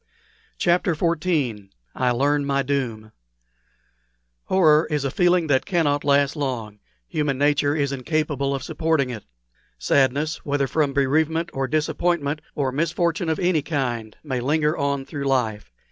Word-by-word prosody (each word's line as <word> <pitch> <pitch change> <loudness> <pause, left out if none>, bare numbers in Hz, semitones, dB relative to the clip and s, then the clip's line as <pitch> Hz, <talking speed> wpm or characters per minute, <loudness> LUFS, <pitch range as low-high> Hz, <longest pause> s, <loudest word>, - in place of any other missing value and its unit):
CHAPTER 175 -1 +2
XIV 150 - -1 0.2
I 125 - 0
LEARN 140 +4 +1
MY 140 0 0
DOOM 120 -6 -3 1.3
Horror 160 -4 +4
is 150 -3 -1
a 135 - -1
feeling 175 +1 +3
that 140 -4 +1
cannot 150 -6 +1
last 140 0 +2
long; 120 -8 -4 0.3
human 150 -3 -1
nature 145 +1 +2
is 140 -3 0
incapable 140 0 -1
of 135 - -5
supporting 155 -3 0
it. 115 -4 -8 0.5
Sadness, 140 - +1
whether 140 -1 0
from 145 0 0
bereavement, 160 +4 +1
or 135 0 -1
disappointment, 155 0 0
or 135 -3 0
misfortune 170 +3 0
of 160 - 0
any 175 -4 +1
kind, 125 -8 -3
may 130 -5 -2
linger 150 +4 +1
on 140 -2 -1
through 140 0 -5
life. 110 - -1
145 Hz, 140 wpm, -23 LUFS, 135-155 Hz, 1.3 s, Horror